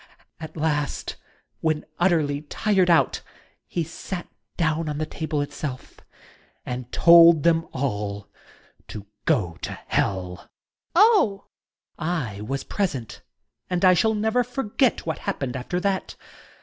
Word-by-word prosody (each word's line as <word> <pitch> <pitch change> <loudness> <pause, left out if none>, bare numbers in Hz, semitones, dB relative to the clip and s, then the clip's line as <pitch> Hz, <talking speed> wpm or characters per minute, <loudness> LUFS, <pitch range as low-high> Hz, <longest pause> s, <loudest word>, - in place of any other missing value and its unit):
At 160 +1 -9
last, 150 -3 -1 0.4
when 155 -2 0
utterly 155 -5 +2
tired 185 +4 +1
out, 170 - +3 0.5
he 170 - -2
sat 175 +2 -6 0.3
down 160 -1 0
on 150 - -3
the 155 - -1
table 155 -1 -3
it 145 - -5
self 130 -4 -6 0.7
and 125 0 -5
told 170 -2 +7
them 165 -1 +3
all 105 -6 -3 0.6
to 105 -2 -8 0.2
go 90 -5 +1
to - - -5
hell! 90 -2 -1
YotJNG - - -17
Ladt. - - -19 0.5
Oh! 420 - +6 0.7
Student. 165 0 -2
I 120 - -3
was 135 +5 -3
present, 140 - -3 0.5
and 180 0 +1
I 185 - +7
shall 220 +5 +2
never 220 +4 +1
forget 245 0 0
what 160 -2 -3
happened 130 -3 -3
after 130 +8 -3
that. 195 0 -2
160 Hz, 135 wpm, -24 LUFS, 130-180 Hz, 0.7 s, told